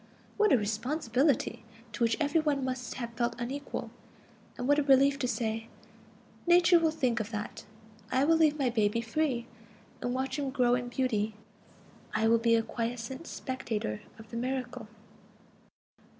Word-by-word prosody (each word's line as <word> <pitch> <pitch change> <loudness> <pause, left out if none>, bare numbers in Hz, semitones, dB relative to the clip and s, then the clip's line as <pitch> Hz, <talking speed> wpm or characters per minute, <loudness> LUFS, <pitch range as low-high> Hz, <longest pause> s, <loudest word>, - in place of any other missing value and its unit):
What 425 -1 +3
a - - +7
responsibility, 235 +2 0 0.3
to - - -7
which 230 -1 +2
every 305 +1 +2
one 290 -4 0
must 255 -2 -4
have 235 -2 -5
felt 235 0 -1
unequal! 270 +4 -4 0.7
And 245 - -3
what 290 +1 +4
a - - +4
relief 275 0 +4
to 250 - 0
say: 225 -1 -2 0.8
"Nature 345 0 +6
will 325 -1 +3
think 255 -7 0
of 215 -1 -3
that. 210 -2 -5 0.5
I 260 - +3
will 325 +3 +5
leave 310 -2 +4
my 265 -4 +1
baby 220 0 +1
free, 240 0 -1 0.6
and 245 - -1
watch 265 +3 -2
him 280 -2 -1
grow 250 -2 +2
in 245 0 0
beauty; 220 -5 0 0.8
I 220 +1 +3
will 230 +1 +5
be 230 0 +4
a 225 - +2
quiescent 240 +6 -4
spectator 220 - -3 0.2
of 220 0 -14
the 235 - -4
miracle." 250 -2 -3
250 Hz, 160 wpm, -30 LUFS, 230-280 Hz, 0.8 s, a